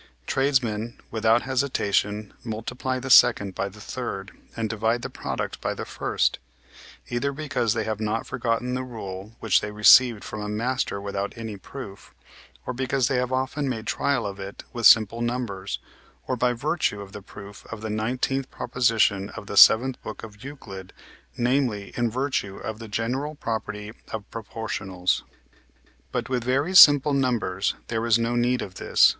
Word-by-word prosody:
Tradesmen 120 -5 0
without 110 +1 +3
hesitation 110 -6 0
multiply 125 +3 -3
the 130 +1 -4
second 105 -6 +6
by 100 - -2
the 105 +2 -15
third, 105 -4 -5 0.3
and 115 -1 -1
divide 115 +2 0
the - - -5
product - - -4
by - - -2
the - - -5
first; - - 0 0.7
either 120 +4 0
because 140 -6 -1
they 110 - 0
have 110 -1 -3
not 110 +1 -1
forgotten 120 +1 -1
the 130 - -1
rule 105 -4 -7
which 110 - +3
they 105 - -4
received 105 +2 +6
from 105 - -6
a 105 - -4
master 115 0 -1
without 100 0 -3
any 110 -2 -5
proof, 100 0 -10 0.5
or - - -3
because 130 0 0
they 135 - +1
have 125 0 -1
often 130 +2 -1
made 115 -3 -4
trial 140 +3 0
of 100 -1 -5
it 95 +1 -8
with 120 -2 +5
simple 115 +1 +5
numbers, 120 -5 -2 0.5
or 130 - -1
by 125 0 +2
virtue 130 -3 -1
of 100 -1 -9
the 100 - -8
proof 100 0 -12
of 115 -2 -6
the 110 - -4
nineteenth 125 +5 -1
proposition 115 -5 +1
of - - -7
the 100 - -6
seventh 125 +5 +7
book - - -8
of 105 +1 -11
Euclid, 100 -10 -9 0.4
namely, 120 -5 0
in 120 -1 +1
virtue 125 -5 -2
of 110 0 -6
the 115 - -8
general 125 +8 -2
property 110 -4 -4 0.2
of 105 -2 -5
proportionals. 100 -5 -2 0.9
But - - -2
with 125 -1 -1
very 135 +8 0
simple 145 -4 +9
numbers 115 -8 0
there 115 -1 -1
is 115 -1 +5
no 115 +1 -1
need 125 +1 +1
of 95 - -8
this. - - +5
115 Hz, 165 wpm, -25 LUFS, 105-130 Hz, 0.9 s, simple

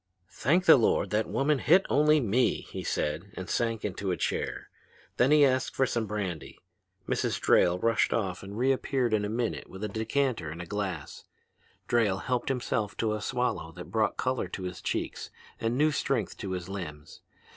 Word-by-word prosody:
"'Thank 170 +8 +1
the 160 - +9
Lord 115 - +2
that 105 0 0
woman 140 +1 +1
hit 180 +8 +4
only 150 +1 +4
me!' 125 0 +1
he - - -5
said, 80 +7 -2
and 95 - -5
sank 115 -2 -1
into 100 -1 -3
a 90 - 0
chair. - - -3 0.5
Then 125 - +4
he 150 -1 +6
asked 130 -1 0
for 135 - +3
some 115 -3 -1
brandy. 95 -6 -4 0.5
Mrs. - - 0
Drayle 90 0 +4
rushed 115 +4 +2
off 95 -5 -1
and 100 +2 -8
reappeared 130 -1 +1
in 105 -1 +2
a - - -3
minute 115 +1 -2
with 95 +2 -9
a - - 0
decanter 110 - -1
and 85 +3 -7
glass. 95 -7 -4 0.6
Drayle 110 -5 +2
helped 125 +1 -1
himself 120 -5 -1
to 110 -2 0
a 105 - -3
swallow 105 -9 -1
that 90 +1 -10
brought 110 0 +1
color 130 -1 -1
to 95 - -6
his 90 0 -5
cheeks - - -3 0.3
and 115 +2 -1
new 155 +2 +4
strength 135 -5 -1
to 95 -2 -4
his 90 -1 -4
limbs. 80 -7 -7
110 Hz, 180 wpm, -29 LUFS, 95-130 Hz, 0.6 s, the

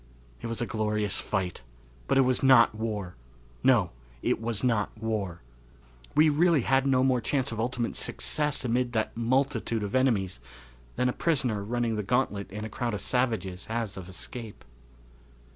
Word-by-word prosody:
It - - -4
was 115 0 -2
a - - +1
glorious 105 -2 -1
fight, 95 -4 -2 0.5
but 135 - +2
it - - +7
was 130 -1 +2
not 130 -5 +6
war; 105 -5 -4 0.5
no, - - +4 0.3
it - - +1
was 115 -1 -2
not 115 -5 +2
war. 105 - -3 0.7
We 155 +2 +6
really 155 0 +4
had 135 +3 +2
no 130 -1 +3
more 130 -2 +2
chance 135 +1 0
of 115 - -5
ultimate 120 0 -1
success 150 -3 -2
amid 120 0 0
that 110 -1 -1
multitude 120 -2 0
of 100 - -4
enemies 110 - +1 0.6
than 125 - +1
a 125 - 0
prisoner 125 -11 0
running 115 +1 -1
the - - 0
gauntlet 105 -2 0
in 105 +2 -5
a - - -3
crowd 120 +1 -2
of - - -4
savages 110 -8 -1
has 110 -3 -2
of 95 -1 -8
escape. 110 +4 -7
115 Hz, 165 wpm, -28 LUFS, 105-130 Hz, 0.7 s, it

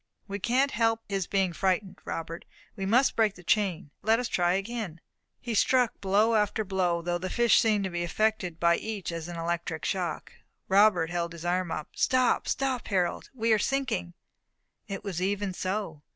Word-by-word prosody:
"We 200 0 -4
can't 260 +7 +2
help 225 0 +1
his 195 -3 -2
being 190 -3 +1
frightened, 190 +1 -1
Robert. 165 +1 -5 0.3
We 195 -2 -3
must 250 +6 +3
break 220 -3 +2
the 180 - -14
chain. 180 -6 0
Let 220 +2 +3
us 250 0 -2
try 175 -4 +2
again." 195 -3 -3 0.4
He 240 - -4
struck 250 +2 +2
blow 205 +4 +3
after 215 0 +1
blow, 180 -3 0
though 175 0 -1
the 185 +1 -4
fish 235 0 +4
seemed 215 -3 +2
to 190 - -3
be 175 0 -2
affected 180 -2 0
by 170 0 +4
each 210 -5 -4
as 165 -1 -5
by 175 - -6
an 170 - -6
electric 165 -1 -3
shock. 180 -4 -2 0.3
Robert 190 -4 +4
held 170 -1 -1
back - - -12
his 170 0 -9
arm. 180 0 0 0.2
"Stop! 255 -1 +2
stop! 265 -3 -1
Harold, 180 -4 -1
we 225 -2 +2
are 215 - +3
sinking!" 265 - -1 0.7
It 195 -1 -5
was 185 -4 -4
even 200 0 -1
so. 185 -5 -3
195 Hz, 185 wpm, -28 LUFS, 175-220 Hz, 0.7 s, fish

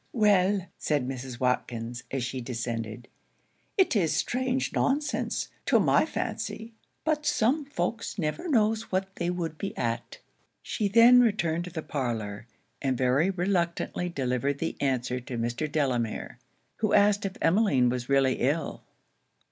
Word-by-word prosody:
'Well,' 200 -4 +3
said 145 -5 0
Mrs. 130 -2 -6
Watkins, 120 -2 -2
as 135 -2 -2
she 125 +1 -3
descended, 115 -1 -4 0.7
'it 380 -10 +3
is 175 -7 +2
strange 260 +1 0
nonsense, 290 +2 0 0.2
to - - +5
my - - +3
fancy; 225 +1 -4 0.3
but 310 -1 0
some 295 0 +2
folks 235 -6 -3
never 165 - -2
knows 220 -6 +1
what 190 +1 -1
they 170 - -1
would 165 -3 -3
be 195 - -4
at.' 115 -1 -3 0.5
She 210 - -1
then 230 +4 +7
returned 175 -7 +1
to - - -6
the 160 -1 -5
parlour, 115 -6 -3 0.3
and 130 -2 0
very 130 +8 +3
reluctantly 180 -1 -1
delivered 135 -2 -1
the 165 - -3
answer 125 -2 0
to 125 0 -6
Mr. 120 +6 -2
Delamere; 125 -7 -1 0.4
who - - 0
asked 205 0 +4
if 195 -1 -3
Emmeline 165 - +3
was 125 0 -3
really 135 -1 +3
ill? 145 +6 -1
160 Hz, 140 wpm, -28 LUFS, 125-205 Hz, 0.7 s, then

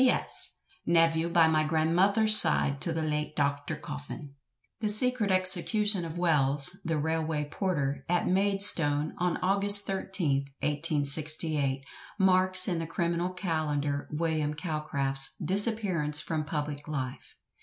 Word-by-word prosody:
"P.S. 260 -1 +3 0.3
Nevyew 165 0 +1
by 170 -2 +3
my 155 -1 0
granmuther's 180 +8 0
side 140 -8 +3
to 170 - -1
the 160 0 -4
late 150 0 -4
Doctur 145 +1 -4
Coffin." 145 -1 -10 0.5
The 215 -2 -2
secret 225 0 +1
execution 185 +1 +1
of 165 +1 -9
Wells, 150 0 +1
the 165 -2 -3
railway 160 0 -3
porter, 145 -5 -4
at 175 0 -1
Maidstone, 185 -6 +1
on 180 -1 -2
August 200 +2 +8
13th, 175 -8 -3
1868, 150 -1 +2 0.3
marks 185 -1 +3
in 175 -3 -2
the 165 - -6
criminal 170 +1 -3
calendar 150 -6 -4
William 155 -1 -3
Calcraft's 145 -4 -4
disappearance 190 -7 -1
from 155 -2 -5
public 145 -1 -6
life. 130 -4 -7
160 Hz, 125 wpm, -26 LUFS, 150-185 Hz, 0.5 s, August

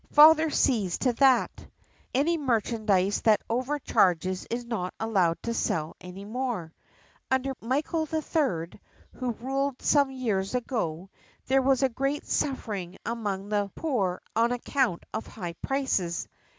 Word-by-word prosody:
Father 315 +1 +8
sees 210 -11 +1
to 250 -2 +1
that. 260 -1 +3 0.4
Any 295 +6 +2
merchant 230 -6 -1
that 200 +2 +3
over 255 +5 -1
charges 185 - +1
is 240 +1 -3
not 215 -6 -3
allowed 190 -7 +2
to 235 - -2
sell 160 -8 -1
any 185 +2 -9
more.. 220 -8 -3 0.6
Under 265 +1 +1
Michael 295 +6 -1
III, 270 - -1 0.3
who 250 -2 -3
ruled 270 +3 -2
some 285 -2 +3
years 225 -6 -2
ago, 195 - -2 0.3
there 270 +1 +3
was 270 0 +2
great 275 +4 -1
suffering 205 -10 -2
among 205 -4 -3
the 205 -1 0
poor 205 - -1
on 230 +2 +3
account 245 -5 0
of 220 - -4
high 175 -5 -6
prices. 260 -11 -1
235 Hz, 130 wpm, -27 LUFS, 195-270 Hz, 0.6 s, Father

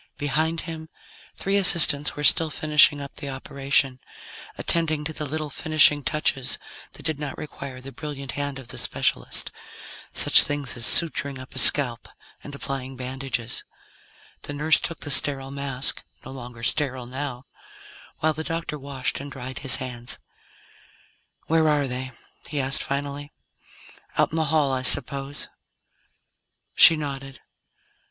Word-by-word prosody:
Behind 155 +3 -1
him, 160 -2 -9 0.5
three 195 +1 -1
assistants 160 -6 +7
were 150 - -6
still 160 +2 +4
finishing 150 -1 +3
up 140 -1 -10
the 145 -2 -7
operation, 135 0 -1 0.6
attending 155 -3 +2
to 160 +1 -4
the 150 -1 -6
little 155 +1 -5
finishing 155 0 +3
touches 135 -1 -1 0.4
that - - -13
did 155 -3 -2
not 145 -3 -6
require 140 -3 -9
the 135 +2 -10
brilliant 140 -2 -7
hand 145 -1 -4
of 130 -3 -12
the - - -2
specialist. - - -1 0.6
Such - - +6
things 145 -3 -1
as 120 -1 -4
suturing 140 -4 +1
up 130 +1 -12
a - - -1
scalp, 125 -5 +8 0.3
and 145 - -9
applying 135 -1 -6
bandages. 130 -2 -4 0.8
The 145 - -7
nurse 155 +2 +2
took 165 - -4
the 145 - -4
sterile 135 0 +2
mask 140 -1 +1 0.2
no 130 - -9
longer 120 -3 -10
sterile 130 -1 -2
now 130 0 -6 0.8
while 155 0 +1
the 160 +1 -6
doctor 165 -2 -5
washed 135 -2 -4
and 140 +1 -9
dried 130 0 -7
his 135 -3 +1
hands. 125 -1 -5 1.3
"Where 160 -1 +2
are 145 -1 +1
they?" 130 +1 -5 0.4
he 145 0 -3
asked 135 +2 0
finally. 145 +1 -5 0.8
"Out - - +2
in 160 - -4
the 160 - 0
hall, 145 -2 0
I 130 - -2
suppose?" 140 +2 +1 1.3
She 165 - +8
nodded. 135 -3 -7
140 Hz, 145 wpm, -23 LUFS, 130-150 Hz, 1.3 s, scalp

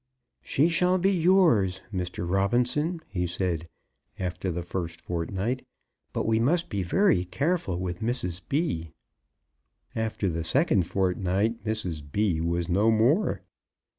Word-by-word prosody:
"She 145 +4 +2
shall 180 +2 +3
be 190 +2 +3
yours, 165 - +3
Mr. 90 -1 -3
Robinson," 125 - +1
he 90 -3 -2
said, 85 -2 -2 0.5
after 90 0 -3
the 90 0 -3
first 85 -1 -4
fortnight. 95 +9 -2 0.5
"But - - -2
we 110 0 +2
must 165 +9 +2
be 100 -2 -1
very 95 - +3
careful 140 - -1
with 90 +1 -3
Mrs. 110 -6 -2
B." 135 - -1 1.0
After 110 -2 -1
the 85 -2 -1
second 105 - +2
fortnight 95 +4 0
Mrs. 105 -8 -3
B. 80 +3 0
was 85 0 -1
no 100 +6 +3
more! 120 - +2
100 Hz, 130 wpm, -27 LUFS, 90-130 Hz, 1.0 s, shall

